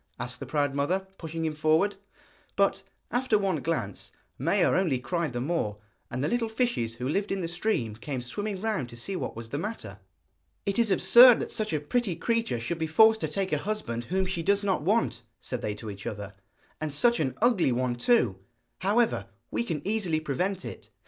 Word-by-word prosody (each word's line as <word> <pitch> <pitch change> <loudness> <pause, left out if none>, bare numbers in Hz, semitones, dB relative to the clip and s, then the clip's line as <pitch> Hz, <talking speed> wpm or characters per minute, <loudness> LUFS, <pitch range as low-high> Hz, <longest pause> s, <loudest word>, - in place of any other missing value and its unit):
asked 125 +1 -4
the 135 - -6
proud 145 0 0
mother, 175 +8 0
pushing 165 0 -4
him 155 - -1
forward. 155 +6 +2 0.6
But, 195 -1 +2 0.3
after 245 -2 +2
one 195 -4 0
glance, 120 - -3 0.3
Maia - - +3
only 170 -9 +2
cried 165 +4 -2
the 120 - -3
more; 125 -7 -1 0.3
and 125 +3 -3
the - - +2
little 235 -2 0
fishes 220 - -1
who 125 +2 -4
lived 195 +8 -1
in 195 -1 -1
the 170 - -2
stream 170 - -1
came 130 +4 -4
swimming 200 - -4
round 210 - -1
to 120 - -11
see 190 +11 -4
what - - -4
was 115 0 -8
the 140 - -3
matter. 215 +6 -6 0.7
'It 200 +2 0
is 230 -2 +4
absurd 240 +5 +8
that - - -4
such 215 -1 -2
a 155 - +1
pretty 190 +5 0
creature 225 - 0
should 155 +9 -3
be 160 - 0
forced 220 +7 +5
to - - 0
take 195 -1 -2
a - - +2
husband 190 - -3
whom 190 +5 0
she 185 -2 -2
does 200 +4 +2
not 195 -5 +1
want,' 195 - +1 0.2
said 125 - -4
they 105 - -2
to 105 0 -7
each 100 0 -8
other. 100 -2 -5 0.5
'And 155 -1 -2
such 235 +12 +3
an 135 -5 -1
ugly 220 - +3
one 125 0 0
too! 120 - +2 0.4
However, 215 +5 +1 0.2
we - - 0
can 165 -7 -4
easily 195 -7 +1
prevent 180 +6 -2
it.' - - -8
170 Hz, 200 wpm, -28 LUFS, 130-205 Hz, 0.7 s, absurd